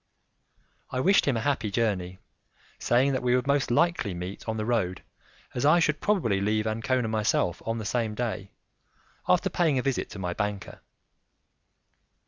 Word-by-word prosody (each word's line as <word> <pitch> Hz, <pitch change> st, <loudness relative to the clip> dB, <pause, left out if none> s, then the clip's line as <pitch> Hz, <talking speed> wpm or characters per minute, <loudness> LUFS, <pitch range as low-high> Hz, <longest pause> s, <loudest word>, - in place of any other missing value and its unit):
I 130 Hz, -, -3 dB
wished 195 Hz, +6 st, +4 dB
him 135 Hz, -4 st, +2 dB
a -, -, -1 dB
happy 130 Hz, -4 st, 0 dB
journey, 100 Hz, -5 st, -1 dB, 0.6 s
saying 130 Hz, +3 st, +3 dB
that 130 Hz, -, -1 dB
we 125 Hz, 0 st, +2 dB
would 125 Hz, -, 0 dB
most 140 Hz, 0 st, +1 dB
likely 120 Hz, -, +1 dB
meet 90 Hz, +5 st, -6 dB
on 110 Hz, -, -2 dB
the 110 Hz, -, -2 dB
road, 110 Hz, -7 st, -1 dB, 0.5 s
as 120 Hz, -, -2 dB
I 155 Hz, +4 st, +5 dB
should 155 Hz, -2 st, +1 dB
probably 120 Hz, -, +1 dB
leave 105 Hz, +1 st, +1 dB
Ancona 115 Hz, +2 st, 0 dB
myself 105 Hz, -5 st, 0 dB
on 115 Hz, 0 st, -1 dB
the 110 Hz, -, -5 dB
same 110 Hz, -1 st, -1 dB
day, 110 Hz, -4 st, -3 dB, 0.8 s
after -, -, +3 dB
paying 160 Hz, -6 st, +2 dB
a 125 Hz, -, 0 dB
visit 135 Hz, -3 st, -1 dB
to -, -, -9 dB
my 90 Hz, -2 st, -3 dB
banker. 105 Hz, 0 st, -4 dB
115 Hz, 165 wpm, -27 LUFS, 105-130 Hz, 0.8 s, I